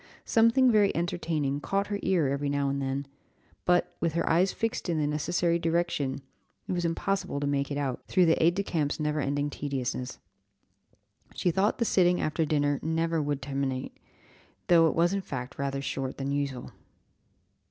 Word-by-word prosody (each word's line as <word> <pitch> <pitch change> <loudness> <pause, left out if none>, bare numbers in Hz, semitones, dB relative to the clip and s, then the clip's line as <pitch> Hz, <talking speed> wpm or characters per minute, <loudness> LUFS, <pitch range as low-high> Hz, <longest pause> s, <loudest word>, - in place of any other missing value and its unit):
Something 230 +3 +4
very 210 -3 +4
entertaining 160 -4 -1
caught 195 +6 -1
her 205 -1 -3
ear 175 -7 +2
every 140 +1 -1
now 140 -1 0
and 140 0 -2
then; 135 +1 -2 0.6
but, 180 0 +2
with 165 -2 0
her 170 - 0
eyes 180 +4 +3
fixed 225 -4 -2
in 165 - +1
the 150 - +1
necessary 170 +3 0
direction, 165 -5 -1 0.4
it - - -3
was 175 -1 -1
impossible 170 -1 -1
to 145 - -2
make 140 -1 0
it 140 - -3
out, 135 -3 -2
through 185 -2 +4
the 165 -1 +3
aid 170 +2 +4
de 200 - 0
camp's 150 -6 -1
never 150 0 0
ending 145 +1 -1
tediousness. 130 -3 -3 1.2
She 180 - +1
thought 195 +5 +1
the 235 - +1
sitting 180 -3 +3
after 155 +1 0
dinner 145 -2 +1
never 165 0 0
would 145 -2 -2
terminate, 135 -1 -3 0.7
though 165 -2 +6
it - - -1
was 170 +3 +3
in 200 - 0
fact 130 -6 -6
rather 140 0 -2
shorter 135 -1 -3
than 135 0 -4
usual. 140 -3 -3
155 Hz, 175 wpm, -28 LUFS, 140-175 Hz, 1.2 s, though